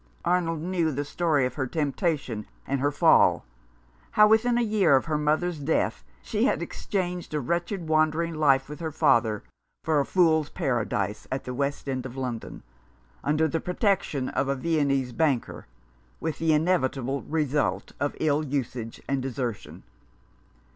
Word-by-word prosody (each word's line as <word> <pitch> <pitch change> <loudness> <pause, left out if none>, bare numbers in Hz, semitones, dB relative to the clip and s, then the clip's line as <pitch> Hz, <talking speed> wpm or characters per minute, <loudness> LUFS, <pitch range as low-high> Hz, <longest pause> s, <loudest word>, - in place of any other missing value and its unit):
Arnold 165 -3 +1
knew 170 -3 0
the 145 +1 -3
story 150 -3 +1
of 125 - -3
her 130 0 -2
temptation 140 -6 -2 0.2
and 140 0 -1
her 145 +2 +2
fall - - +4 0.3
— - - -33
how, 210 0 +7
within 230 +3 +3
a 240 - +2
year 210 -9 +4
of 130 - +2
her 160 -2 -1
mother's 155 +2 0
death, 145 +3 0 0.2
she - - 0
had - - +2
exchanged 180 -5 -3
a - - +1
wretched 170 - -2
wandering 155 +2 +2
life 140 -4 +3
with 150 +2 -8
her 165 -2 -3
father 115 -9 +2 0.4
for 155 -2 +2
a 140 - +1
fool's 160 -5 +3
paradise 110 - -2
at 130 +1 -2
the 125 - -5
West 140 +2 -2
End 130 -2 -2
of 130 +1 -11
London, 125 -3 -5 0.6
under 150 +2 +2
the 165 +2 -1
protection 180 - 0
of 135 - -1
a 140 - 0
Viennese 140 -4 0
banker, 135 - -1 0.5
with 160 - -3
the 160 -1 +2
inevitable 140 -5 +1
result 150 -2 -1
of 145 - -1
ill 150 -1 +2
usage 130 -5 -4
and 135 -1 0
desertion. 125 -4 -5
150 Hz, 160 wpm, -26 LUFS, 130-165 Hz, 0.6 s, how